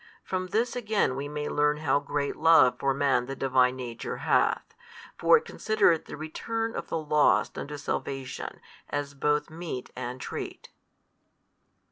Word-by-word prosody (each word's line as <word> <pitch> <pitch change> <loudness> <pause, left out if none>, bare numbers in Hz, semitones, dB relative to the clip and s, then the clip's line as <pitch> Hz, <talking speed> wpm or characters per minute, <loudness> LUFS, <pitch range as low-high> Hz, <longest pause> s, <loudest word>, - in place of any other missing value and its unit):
From 185 -1 -2
this 230 +5 0
|225 - - -7
again 215 - +1
we 140 +2 -4
may 150 0 -4
learn 150 0 +2
how 150 -1 +2
great 145 0 -2
love 160 -7 +5
for 135 - +2
man 135 -2 +1
the 135 - -4
Divine 130 -1 +3
Nature 125 -3 -5
hath: - - +1 0.4
for - - +6
It 460 - -5
considereth 175 -7 +2
the - - -8
return 225 +9 -3
of - - -4
the - - -2
lost 150 -1 +2
unto 145 +1 -5
salvation 135 -2 -4 0.3
as 145 0 -3
both 150 +2 0
meat 160 -6 -6
and 125 0 -5
treat. - - -6
145 Hz, 155 wpm, -28 LUFS, 135-165 Hz, 0.4 s, for